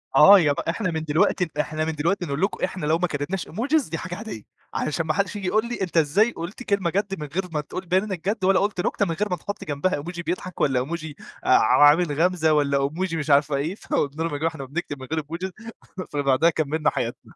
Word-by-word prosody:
آه، 195 +8 +9
يا 150 -4 +3
ب - - -5
إحنا 175 +2 -1
من 160 -1 -3
دلوقتي 160 +3 +1
إحنا 155 +1 -1
من 160 - -1
دلوقتي 175 +5 0
نقول 140 0 -3
لكُم 195 - -1
إحنا 185 -3 -2
لو 155 +2 +2
ما 180 +1 0
كتبناش 160 +5 -3
إيموجيز 270 - 0
دي 165 - -3
حاجة 180 +1 -5
عادية، 210 - -7 0.3
علشان 155 +2 -1
ما 155 - 0
حدش 200 +2 -1
ييجي 200 -3 -4
يقول 215 +5 +2
لي: 240 - -4
"أنتَ 180 -2 -2
إزاي 180 +10 +3
قلت 170 +9 -7
كلمة 200 -6 0
جد، 195 0 -2
من 150 - -5
غير 180 +7 -2
ما 150 -2 -1
تقول 185 +5 -7
تبيَّن 185 +3 +1
إنَّك 190 -3 -3
جد، 210 -2 -2
ولا 195 0 +4
قلت 200 -3 0
نكتة 200 - +1
من 170 - -2
غير 210 +4 -1
ما 180 - 0
تحُط 200 +4 -6
جنبها 150 +5 -1
إيموجي 170 +4 -5
بيضحك 180 +1 -4
والّا 135 -3 +2
إيموجي 155 +2 -4 0.3
ع 145 - +5
عامل 150 +2 +5
غمزة 175 -3 +3
والّا 140 -2 +2
إيموجي 165 +4 -2
مش 155 0 -4
عارفة 140 0 +4
إيه؟" 155 +7 -2
فقلنا 150 -5 -2
لهُم: 165 -3 -2
"يا - - -1
جماعة 160 +2 0
إحنا 140 -4 -7
بنكتب 145 0 -5
من 130 - -9
غير 160 - +1
إيموجيز." 170 +5 -5 0.6
فبعدها 145 +2 +3
كمَّلنا 155 -1 0
حياتنا. - - -5
165 Hz, 240 wpm, -24 LUFS, 150-190 Hz, 0.6 s, آه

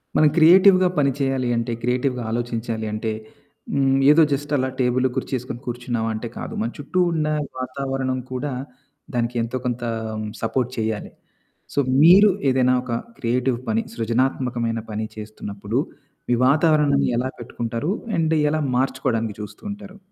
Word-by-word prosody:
మనం 155 - +6
క్రియేటివ్‌గా 185 +3 +7
పని 140 -1 +3
చేయాలి 135 -2 0
అంటే, 115 +1 -2
క్రియేటివ్‌గా 125 +1 0
ఆలోచించాలి 115 -1 -2
అంటే, 110 +1 -2 0.6
హ్మ్, 135 -1 +3
ఏదో 155 +2 +6
జస్ట్ 145 +1 -3
అలా 130 0 0
టేబులు, 130 +1 +2
కుర్చీ - - -3
యేసుకొని 125 -1 -5
కూర్చున్నావా 120 -2 -2
అంటే 110 +2 -4
కాదు. - - -6
మన 115 - -1
చుట్టూ 150 +5 -2
ఉన్న 155 -2 0 0.3
వాతావరణం 130 0 -2
కూడా 130 +2 -3 0.6
దానికి 120 0 -1
ఎంతో 115 +3 -3
కొంత 120 -1 -2 0.3
హ్మ్. 110 0 -4
సపోర్ట్ 125 +2 -1
చేయాలి. 110 -1 -2 0.6
సో, - - +1 0.2
మీరు 190 +5 +8 0.2
ఏదైనా 130 -1 +3
ఒక 125 - -6 0.3
క్రియేటివ్ 125 +1 0
పని, 110 +1 +1
సృజనాత్మకమైన 120 0 0
పని 110 +1 -2
చేస్తున్నప్పుడు, 105 +1 -4 0.5
ఈ - - +4
వాతావరణాన్ని 150 -1 +3
ఎలా 130 +2 0
పెట్టుకుంటారు? 120 +5 -3 0.3
అండ్ 160 -1 +2 0.2
ఎలా 155 +1 0 0.2
మార్చుకోవడానికి 115 -4 -1
చూస్తూంటారు? 200 - -8
125 Hz, 135 wpm, -22 LUFS, 115-140 Hz, 0.6 s, మీరు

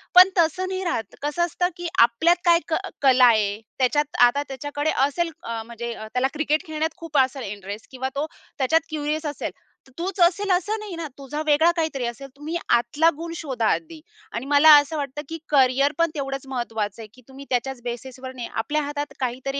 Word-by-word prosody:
पण 365 +1 +10
तसं 345 +3 +2
नाही 375 0 -3
राहत. 230 - -3
कसं 295 +4 0
असतं 355 +1 -1
की 350 0 -4
आपल्यात 240 +9 +5
काय 340 -1 +6
क 320 - +2 0.3
कला 260 -2 +6
आहे, 215 -3 +3 0.2
त्याच्यात 290 +3 +1
आता 245 +4 +4
त्याच्याकडे 290 +3 -3 0.2
असेल 335 +4 -1
अ, 230 -1 -4
म्हणजे 235 +1 -6 0.2
त्याला 250 +1 +2
क्रिकेट 305 0 0
खेळण्यात 315 0 -2
खूप 330 -3 -4
असेल 265 0 +2
इंटरेस्ट 205 +1 -8
किंवा 260 0 -3
तो 285 +2 0 0.3
त्याच्यात 295 +4 +3
क्युरियस 305 0 -2
असेल. 295 -1 -3 0.4
तर - - -20
तोच 375 +3 -4
असेल 380 +3 +3
असं 375 +5 +1
नाही 420 -4 -7
ना 330 -1 -4
तुझा 280 +2 -5
वेगळा 310 +3 +4
काहीतरी 315 -6 -1
असेल 240 +3 -5
तुम्ही 300 +4 -6
आतला 240 +8 +3
गुण 330 +1 -6
शोधा 265 -9 -3
आधी 325 0 -6 0.3
आणि 235 +3 -4
मला 290 +2 +7
असं 290 +2 -3
वाटतं 285 0 -4
की 325 - -4
करियर 275 0 +4
पण 335 0 +3
तेवढंच 275 -1 -4
महत्त्वाचं 225 -5 -3
आहे 220 - -9
की 255 - -18
तुम्ही 270 +1 -11
त्याच्याच 255 0 -1
बेसिसवर 255 +2 -6
नाही, 245 -2 -6
आपल्या 300 +7 -1
हातात 290 0 -4
काहीतरी 260 +2 -2
285 Hz, 190 wpm, -23 LUFS, 255-320 Hz, 0.4 s, पण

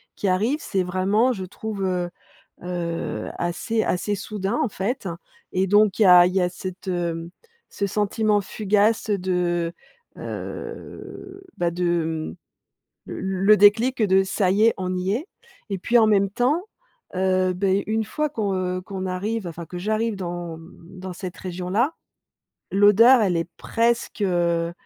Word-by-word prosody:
qui 205 - -2
arrive, 210 +10 +2
c'est 190 -2 -1
vraiment, 190 +7 +2
je 190 -5 -5
trouve, 205 +2 -5
heu, 180 -1 -1 0.5
heu, 175 -2 -3
assez 175 +6 -1
assez 205 +3 -1
soudain, 205 +2 -3
en - - +1
fait 205 +3 -3 0.5
et 185 +1 +1
donc, 205 +1 +4
il - - +6
y - - +5
a 180 -1 +9
il 180 - -3
y 190 - +3
a 180 - +1
cette, 185 +1 -8
hem, 170 -2 -2 0.4
ce 200 - -2
sentiment 210 +1 +1
fugace 210 +2 +1
de, 180 -3 0 0.4
heu, 385 0 -8 0.2
bah, 175 -1 0
de, 165 - -1 0.7
mmh, - - -8
l - - -5
le 190 +2 +3
déclic 225 +5 +4
de: 190 -1 +4
«Ça 190 0 0
y 205 +3 +3
est, 230 - +5
on 185 -1 -2
y 180 +1 -1
est» 275 - -3 0.4
et 195 - -2
puis, 235 +6 +3
en 225 - +5
même 200 -2 +3
temps, 265 - +1 0.5
heu, 185 0 +2
beh, 195 +2 +1
une 220 +1 0
fois 300 +8 -2
qu'on, 215 -8 -2
heu, 185 0 -2
qu'on 190 0 -6
arrive, 195 +3 -2
enfin, 170 0 -7
que 180 - -8
j'arrive 215 +3 0
dans, 175 -3 -5
mmh, 170 +2 -14
dans 185 0 -6
cette 185 0 -7
région-là. 185 - -1 0.8
L'odeur, 210 +6 +6
elle 185 -4 +2
est 165 0 -2
presque 235 -1 0
heu, 170 -3 +1
190 Hz, 160 wpm, -23 LUFS, 180-215 Hz, 0.8 s, a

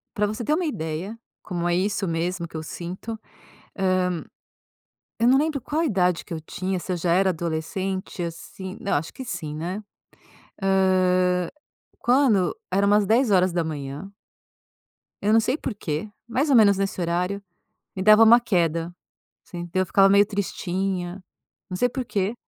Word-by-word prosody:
Para 210 -1 +1
você 215 +3 -4
ter 300 - +2
uma 360 - 0
ideia, 185 - -4 0.2
como 175 -2 -2
é 175 - +2
isso 195 +2 0
mesmo 170 +2 -2
que 165 - -10
eu 160 - -4
sinto: 180 +7 -6 2.1
Hã, - - +2
eu - - +5
não 260 +2 +6
lembro 300 -1 0
qual 305 +6 -1
idade 180 - +1
que 180 - -8
eu 160 - -3
tinha, 185 +4 -3
se 185 - -5
eu - - -2
já 170 0 0
era 190 +2 +4
adolescente, 175 +3 -3
assim 185 +3 -7
Não, 200 - -2
eu - - +4
acho 155 +3 -5
que 260 - -8
sim, 170 -9 -5
né. 180 +7 -4 0.8
Hã, 185 -2 +2 0.5
quando 240 -8 +3 0.2
era 200 +2 +2
umas 205 0 +4
10h. 180 - +1 1.1
eu 210 - +2
não 225 - +6
sei 250 +6 0
porquê, 205 - -4 0.2
mais 270 +6 0
ou 265 - +6
menos 200 -3 +6
nesse 195 -1 -2
horário, 180 +4 -1 0.5
me 190 - -3
dava 215 +2 +8
uma 235 +2 +8
queda, 170 -6 0 0.5
assim, 175 -1 -7
eu 185 0 +2
ficava 195 +2 +5
meio 200 +1 +5
tristinha, 190 -2 -3 0.5
não 180 - -3
sei 245 +6 +2
porquê, 225 -5 -2
190 Hz, 160 wpm, -24 LUFS, 175-215 Hz, 2.1 s, dava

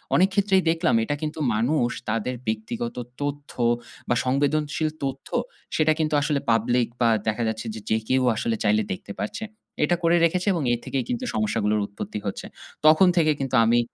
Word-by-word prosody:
অনেক 190 +3 +5
ক্ষেত্রেই 195 -2 +3
দেখলাম 165 -5 +2
এটা 145 - -1
কিন্তু 155 0 -4
মানুষ 120 +3 +1 0.2
তাদের 115 +3 -1
ব্যক্তিগত 110 +2 -3 0.3
তথ্য 145 0 -4 0.6
বা 120 - +3
সংবেদনশীল 145 +3 +1
তথ্য 135 0 -4 0.5
সেটা 155 0 +3
কিন্তু 155 -1 0
আসলে 150 -1 +1
public 120 +2 +2
বা 115 - +5 0.2
দেখা 110 +2 0
যাচ্ছে 110 +1 -3
যে, 110 - -6
যে 110 - +3
কেউ 130 0 +3
আসলে 115 0 -1
চাইলে 105 +1 +3
দেখতে 100 +2 -8
পারছে। 165 - -4 0.4
এইটা 175 +4 +3
করে 165 +1 +4
রেখেছে 180 +4 0
এবং 165 -5 -1
এর 120 - -1
থেকেই 135 -2 -1
কিন্তু 245 +1 -2
সমস্যাগুলোর 105 - +1
উৎপত্তি 105 +1 -6
হচ্ছে। 100 - -4 0.4
তখন 160 +4 +7
থেকে 155 -2 +4
কিন্তু 135 -1 -1
আমি 120 +1 +4
135 Hz, 170 wpm, -24 LUFS, 115-155 Hz, 0.6 s, তখন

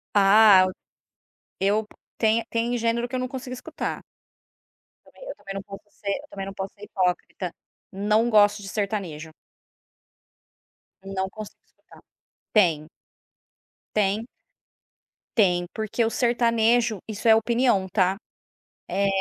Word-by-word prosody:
Ah, 200 -1 +7 0.9
eu 205 +3 +1 0.3
tem 225 +1 +2
tem 235 +1 -1
gênero 235 +1 0
que - - -19
eu 255 - -1
não 255 - -2
consigo 255 -1 -7
escutar. 250 - -5 1.0
Também - - -14
eu - - -6
também 195 - -9
não 195 - -3
posso 200 +1 -11
ser 200 0 -7
eu - - -15
também 195 -1 -6
não 195 - -7
posso 195 0 -6
ser 205 - -15
hipócrita, 180 -1 -2 0.4
não 210 +4 +1
gosto 210 -1 +4
de 195 - -8
sertanejo. 185 -7 -4 1.7
Não 190 0 -3
consigo 215 +1 -10
escutar, - - -21 0.5
tem. 165 -7 +3 1.1
Tem. 210 +2 +1 1.1
Tem, 180 -4 +3
porque 220 +1 -1
o 225 - -1
sertanejo, 235 -2 +2
isso 215 +1 -4
é 225 - +8
opinião, 230 -4 +2
tá, 190 -1 +2 0.7
eh, 200 0 +1
210 Hz, 125 wpm, -25 LUFS, 195-230 Hz, 1.7 s, é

